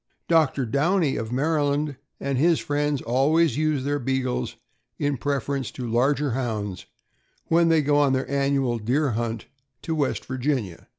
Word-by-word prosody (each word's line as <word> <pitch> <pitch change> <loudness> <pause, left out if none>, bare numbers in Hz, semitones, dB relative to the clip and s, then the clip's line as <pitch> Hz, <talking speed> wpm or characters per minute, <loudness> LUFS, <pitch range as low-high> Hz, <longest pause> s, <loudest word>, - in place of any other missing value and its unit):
Doctor 155 -5 +3
Downey, 150 - +1
of 110 0 -4
Maryland, 145 +1 0 0.2
and 135 -2 -1
his 165 +2 +4
friends 145 -1 -1
always 140 +5 +2
use 155 -2 0
their 145 +1 -1
Beagles 130 - -2 0.4
in 145 -1 0
preference 140 -1 -2
to 125 - -5
larger 135 +4 +1
Hounds 110 -6 -3 0.6
when 165 0 +4
they 160 -2 +4
go 145 +1 +2
on 145 -2 +3
their 130 0 -1
annual 140 -3 0
deer 130 +6 +1
hunt 115 0 -3 0.4
to 165 - -2
West 145 -4 -1
Virginia. 130 - -2
140 Hz, 145 wpm, -24 LUFS, 125-150 Hz, 0.6 s, his